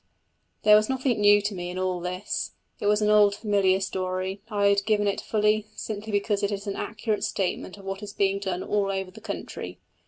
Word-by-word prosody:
There 210 0 +8
was 215 +2 +3
nothing 260 -4 0
new 205 0 +6
to 205 0 -1
me 175 -2 -5
in 180 - -6
all 185 -1 -1
this: 180 +2 -3 0.3
it 205 - -1
was 210 +1 +3
an 210 - +3
old 205 -1 +5
familiar 200 -3 +2
story; 185 +1 -3
I 205 -2 +1
have 200 0 +3
given 210 -1 +2
it 200 - 0
fully, 210 0 +1
simply 215 0 -5
because 205 0 0
it 200 0 0
is 200 0 -4
an 200 - -3
accurate 215 -1 -2
statement 190 0 -2
of 195 - -13
what 195 +1 -4
is 205 -1 -6
being 195 -1 +1
done 190 -2 -3
all 205 -1 0
over 190 -1 -3
the 220 - -13
country. 220 - -6
200 Hz, 215 wpm, -26 LUFS, 190-210 Hz, 0.3 s, There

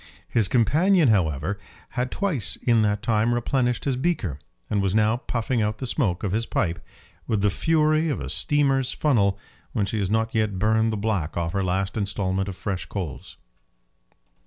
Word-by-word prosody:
His 110 -5 +2
companion, 155 - +3
however, 90 -1 +1 0.3
had 125 0 -2
twice 135 - -1
in 115 -2 +2
that 105 0 0
time 115 +2 +2
replenished 120 0 0
his 135 -2 +1
beaker, 125 - -1 0.3
and 100 -2 0
was 100 0 0
now 110 +1 +3
puffing 120 -1 -1
out 105 0 -1
the 130 - -5
smoke 110 - -1
of 100 - -1
his 115 +3 -1
pipe 85 -4 -1 0.4
with 105 -3 0
the 105 - +3
fury 155 - +2
of 145 - -1
a - - -5
steamer's 135 -3 +1
funnel 100 -10 +2 0.4
when 105 -5 +1
she 110 +2 -2
has 95 -2 0
not 110 +3 0
yet 110 -4 0
burned 110 +3 +2
the 110 - -2
black 100 -7 -1
off 85 -1 -1
her 100 - 0
last 95 +3 -1
instalment 95 -1 -1
of 95 - -6
fresh 95 -1 -4
coals. 85 -10 -6
110 Hz, 180 wpm, -24 LUFS, 100-125 Hz, 0.4 s, companion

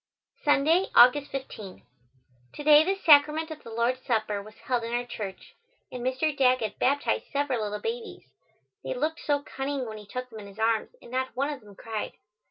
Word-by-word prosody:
Sunday, 310 +6 +3
August 260 +4 +7
15. 215 - -8 0.7
To 295 - -7
day 300 +1 +7
the 385 +4 0
Sacrament 315 -2 +5
of 310 - -8
the - - -11
Lord's 235 +3 0
Supper 215 -3 -1
was 215 +2 -14
held 245 -2 -2
in 230 +1 -4
our 245 0 -1
church, 205 -5 -7 0.4
and 250 -1 -6
Mr. 260 +4 0
Daggett 255 -5 +2
baptized 280 +2 +1
several 280 -4 0
little 210 0 -3
babies. 460 0 -5 0.6
They - - -3
looked 310 +5 -1
so 285 -1 0
cunning 270 -1 -3
when 215 -2 -7
he 210 - -13
took 250 +4 -6
them 220 - -9
in 205 - -10
his 200 +1 -14
arms 225 0 +1
and - - -13
not 260 0 -2
one 280 +3 0
of 275 - -10
them 205 -2 -16
cried. 220 +1 -5
255 Hz, 190 wpm, -27 LUFS, 225-290 Hz, 0.7 s, August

